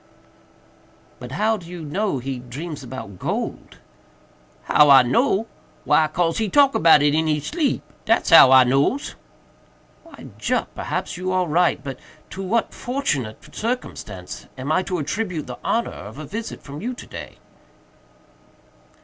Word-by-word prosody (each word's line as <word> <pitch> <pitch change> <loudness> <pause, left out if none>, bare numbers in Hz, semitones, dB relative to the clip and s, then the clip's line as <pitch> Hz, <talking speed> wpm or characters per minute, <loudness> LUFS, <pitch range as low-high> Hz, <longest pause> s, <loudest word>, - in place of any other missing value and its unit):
"But 125 +1 -8
how 220 +8 +1
do 175 -4 -12
you 175 -2 -7
know 185 +3 -1
he 130 0 -4
dreams 145 +6 -7
about 120 -7 -8
gold?" - - -4 0.9
"How 150 -1 +5
I 135 -2 +9
know? 220 - +1 0.4
why 155 - +4
'cause 165 +4 0
he 220 -2 0
talk 280 +4 +5
about 155 -2 +5
it 145 0 +3
in 160 +1 +1
he 150 -1 +1
sleep—dat's 250 - -1
how 150 -5 +9
I 130 -1 +8
nose." 140 - +1 0.9
"Well, 330 - -13
Jup, - - -1
perhaps - - -4
you 185 +1 -3
are 185 -1 +1
right; 170 +2 +1
but 135 -3 -6 0.3
to 190 - -6
what 220 +4 0
fortunate 145 - -3
circumstance 110 - -5
am 130 +4 -4
I 185 - +3
to 185 -1 -3
attribute 170 +1 -3
the 125 -1 -8
honor 235 - 0
of 105 +5 -10
a 155 - -7
visit 225 +7 -6
from 145 +1 -9
you 245 +4 -3
to - - -10
day?" - - -9
160 Hz, 150 wpm, -22 LUFS, 135-215 Hz, 0.9 s, I